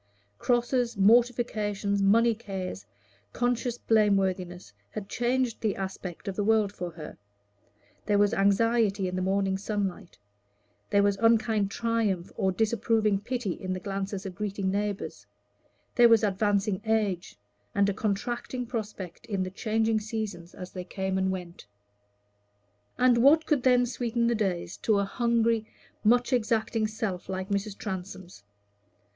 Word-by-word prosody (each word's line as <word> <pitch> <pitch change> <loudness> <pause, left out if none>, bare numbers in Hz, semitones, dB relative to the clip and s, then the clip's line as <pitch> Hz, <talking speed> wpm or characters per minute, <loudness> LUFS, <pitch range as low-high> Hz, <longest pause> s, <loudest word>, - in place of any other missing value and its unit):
Crosses, 240 -1 +1
mortifications, 210 -2 +2
money 230 +4 +4
cares, 190 - -6 0.5
conscious 245 0 0
blame 215 -4 +3
worthiness, 180 - -3 0.2
had 205 -2 -6
changed 245 0 0
the 215 -3 0
aspect 190 -1 -6
of 195 - -3
the 205 - 0
world 215 -1 +3
for 180 -2 -5
her; 160 -8 -10 0.9
there 205 -1 +3
was 205 +1 +3
anxiety 200 -1 +2
in 180 - -3
the 185 - -1
morning 190 0 0
sunlight; 200 -4 -3 0.7
there 200 -1 +4
was 200 -1 +2
unkind 220 -3 +3
triumph 215 -5 -1
or 190 - +1
disapproving 220 0 +1
pity 240 -1 -3
in 185 +2 -4
the 185 - -3
glances 195 +1 -4
of 190 - -5
greeting 200 -1 -2
neighbors; 200 - -3 0.7
there 240 -1 +6
was 230 -1 +5
advancing 205 -1 +1
age, 210 - -1 0.4
and 200 0 +3
a 200 - +1
contracting 240 +5 -2
prospect 210 -7 -6
in 200 -4 -1
the 185 - -5
changing 220 +2 0
seasons 210 -6 -5
as 180 0 -8
they 180 - -6
came 190 +1 -3
and 190 0 +1
went. 175 - -6 1.3
And 245 -1 +4
what 295 +6 +6
could 295 -5 +2
then 250 -1 +4
sweeten 235 -1 -1
the 235 - +3
days 185 -6 -2
to 215 -2 +1
a 200 - +1
hungry, 230 0 +1 0.4
much 245 +4 +3
exacting 225 -1 +1
self 215 -4 -4
like 190 +1 -4
Mrs. 200 0 -2
Transome's? 185 - -7
205 Hz, 140 wpm, -28 LUFS, 190-230 Hz, 1.3 s, there